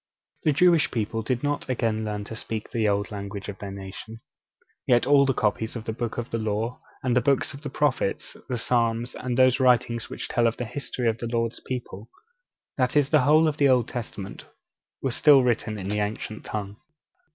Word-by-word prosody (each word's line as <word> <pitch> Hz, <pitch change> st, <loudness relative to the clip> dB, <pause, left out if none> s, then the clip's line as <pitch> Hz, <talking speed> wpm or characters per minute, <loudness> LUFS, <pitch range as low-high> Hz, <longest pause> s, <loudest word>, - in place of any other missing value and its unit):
The 155 Hz, -, +5 dB
Jewish 170 Hz, +2 st, +4 dB
people 115 Hz, -1 st, -2 dB
did 125 Hz, +3 st, -2 dB
not 145 Hz, -2 st, -1 dB
again 115 Hz, -3 st, 0 dB
learn 105 Hz, -1 st, -3 dB
to 110 Hz, -, -8 dB
speak 110 Hz, -1 st, -5 dB
the 110 Hz, -3 st, +1 dB
old 100 Hz, 0 st, 0 dB
language 100 Hz, 0 st, -6 dB
of 100 Hz, -, -7 dB
their 100 Hz, -, -6 dB
nation. 100 Hz, +3 st, -8 dB, 0.7 s
Yet 120 Hz, -1 st, +4 dB
all 140 Hz, 0 st, +5 dB
the 135 Hz, -, +3 dB
copies 110 Hz, +2 st, 0 dB
of 115 Hz, -, -5 dB
the 110 Hz, -, -2 dB
Books 115 Hz, 0 st, -4 dB
of 120 Hz, -1 st, -4 dB
the 115 Hz, -, -1 dB
Law, 110 Hz, +3 st, -2 dB, 0.2 s
and 125 Hz, -1 st, +1 dB
the 125 Hz, -, +4 dB
Books 140 Hz, +4 st, +1 dB
of 140 Hz, -, -10 dB
the 150 Hz, -, -5 dB
Prophets, 135 Hz, -7 st, -1 dB
the 125 Hz, -, -1 dB
Psalms, 115 Hz, 0 st, +1 dB
and 125 Hz, -1 st, -3 dB
those 130 Hz, 0 st, +5 dB
writings 120 Hz, -2 st, +2 dB
which -, -, -6 dB
tell 120 Hz, -1 st, +2 dB
of 115 Hz, -, -1 dB
the 125 Hz, -, -3 dB
history 125 Hz, 0 st, -3 dB
of 115 Hz, 0 st, 0 dB
the 120 Hz, -, -3 dB
Lord's 115 Hz, 0 st, -1 dB
people 120 Hz, -5 st, -6 dB, 0.7 s
that 125 Hz, +1 st, +1 dB
is, 145 Hz, -1 st, +3 dB
the 155 Hz, -3 st, +5 dB
whole 155 Hz, +4 st, +5 dB
of 155 Hz, -1 st, -1 dB
the 140 Hz, -2 st, +4 dB
Old 125 Hz, -3 st, +3 dB
Testament 105 Hz, -5 st, -6 dB, 0.6 s
were 135 Hz, -, 0 dB
still 140 Hz, +1 st, +6 dB
written 115 Hz, -3 st, 0 dB
in 95 Hz, -2 st, -5 dB
the 105 Hz, +1 st, -1 dB
ancient 105 Hz, +1 st, -4 dB
tongue. 105 Hz, -1 st, -5 dB
115 Hz, 210 wpm, -25 LUFS, 110-130 Hz, 0.7 s, still